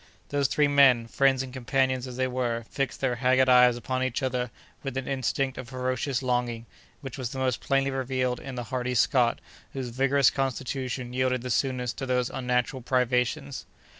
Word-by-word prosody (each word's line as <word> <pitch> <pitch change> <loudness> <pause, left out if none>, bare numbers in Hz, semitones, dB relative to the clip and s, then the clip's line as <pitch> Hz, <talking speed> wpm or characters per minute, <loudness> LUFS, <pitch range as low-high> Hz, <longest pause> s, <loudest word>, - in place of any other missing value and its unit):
Those 140 -1 +1
three 150 +3 +2
men, 135 -5 +5
friends 135 +2 +2
and 130 -1 -9
companions 130 0 0
as 125 -1 -8
they 130 - +1
were, 120 -2 -2
fixed 135 -3 -2
their 125 -3 0
haggard 130 +1 +3
eyes 125 -1 +6
upon 130 +1 -3
each 130 0 -1
other 125 -1 -1 0.3
with 135 -2 -4
an 135 - -3
instinct 135 0 -1
of 125 -2 -8
ferocious 130 +1 -2
longing, 120 -2 -1 0.4
which 135 0 -7
was 125 0 -4
most 130 -2 -1
plainly 135 0 +1
revealed 130 -1 -1
in 135 -2 -7
the 120 - -4
hardy 125 0 -1
Scot, 120 0 +3 0.3
whose 130 -2 -4
vigorous 135 +2 +3
constitution 130 -1 -3
yielded 130 -1 0
the 125 - -3
soonest 125 -2 -1
to 135 - -4
these 125 -1 0
unnatural 125 +1 -1
privations. 125 +3 0
130 Hz, 175 wpm, -27 LUFS, 125-135 Hz, 0.4 s, eyes